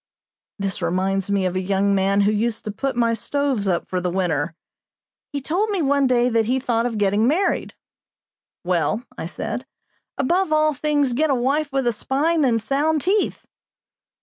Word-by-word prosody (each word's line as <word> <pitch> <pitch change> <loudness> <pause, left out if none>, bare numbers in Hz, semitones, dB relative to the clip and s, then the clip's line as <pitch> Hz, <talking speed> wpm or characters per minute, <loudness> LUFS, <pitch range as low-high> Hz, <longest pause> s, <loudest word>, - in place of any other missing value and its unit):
This 195 -2 -3
reminds 190 +3 0
me 200 -2 +1
of 185 0 -1
a 185 - 0
young 195 +1 +1
man 195 +1 +2
who 205 +1 +3
used 220 +2 -1
to 210 - -3
put 265 +5 -3
my 230 -1 +2
stoves 270 -3 -1
up 175 -3 0
for 180 -1 -2
the 180 - -1
winter. 170 -3 -1 0.8
He 285 - -2
told 365 +10 0
me 390 -5 0
one 280 -1 +3
day 245 -1 +3
that 225 -3 +1
he 255 +2 +1
thought 240 -2 0
of 230 -3 -4
getting 205 +2 +2
married. 350 +8 0 0.9
"Well," 180 +5 0
I - - -5
said, - - -5 0.5
"above 345 +5 +1
all 310 0 +3
things 290 -2 +1
get 305 +5 +1
a 275 - +3
wife 280 +4 0
with 270 -1 0
a 240 - +2
spine 300 +8 0
and 230 -3 +2
sound 290 +6 0
teeth." 405 +3 0
240 Hz, 180 wpm, -22 LUFS, 195-285 Hz, 0.9 s, who